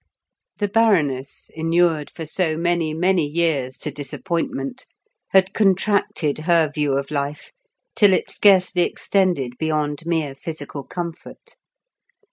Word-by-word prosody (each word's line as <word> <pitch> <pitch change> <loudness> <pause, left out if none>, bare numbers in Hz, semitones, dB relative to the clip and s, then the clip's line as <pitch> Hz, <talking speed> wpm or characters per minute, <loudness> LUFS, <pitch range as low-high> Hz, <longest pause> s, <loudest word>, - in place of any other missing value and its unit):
The 205 - 0
Baroness, 165 - +1
inured 165 -1 +1
for 165 - -8
so 160 0 -1
many, 170 -1 0
many 175 +2 +2
years 145 -5 -1
to 150 - -3
disappointment, 180 - -4 0.4
had 190 0 +3
contracted 195 -7 +1
her 165 -1 +2
view 150 -2 0
of 140 +1 -2
life 145 0 -3 0.4
till 205 -2 +5
it 185 - +1
scarcely 185 -3 +3
extended 175 -11 0
beyond 155 0 -1
mere 160 -5 -1
physical 145 0 -7
comfort. 170 +2 -8
165 Hz, 115 wpm, -21 LUFS, 145-185 Hz, 0.4 s, till